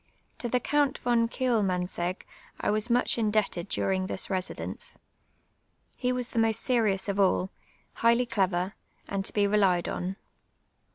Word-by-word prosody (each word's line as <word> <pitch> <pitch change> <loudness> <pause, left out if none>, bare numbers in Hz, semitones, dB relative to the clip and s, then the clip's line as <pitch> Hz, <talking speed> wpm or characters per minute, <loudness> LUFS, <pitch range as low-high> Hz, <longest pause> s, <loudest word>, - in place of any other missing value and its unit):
'Jo 240 - -1
the 250 +2 +1
Count 285 +1 +1
von 235 -1 +2
Kiclmaiuiseij:;ji; 185 -7 -1 0.3
I - - 0
was 215 +3 0
much* 240 0 +2
indebted 210 -4 0
dining 185 -1 0
this 190 - -1
residince. 185 -1 -4 1.0
He 250 -1 0
was 250 -1 -2
the 230 - -1
most 225 0 +2
serious 215 -7 +1
of 200 -1 -1
all^ 190 -1 +2 0.4
highly 235 +2 +3
clever, 190 -4 0 0.3
and 195 -1 -2
to - - -2
be 205 -1 +2
relied 195 -4 +3
on. 185 +2 -3
210 Hz, 145 wpm, -28 LUFS, 190-235 Hz, 1.0 s, highly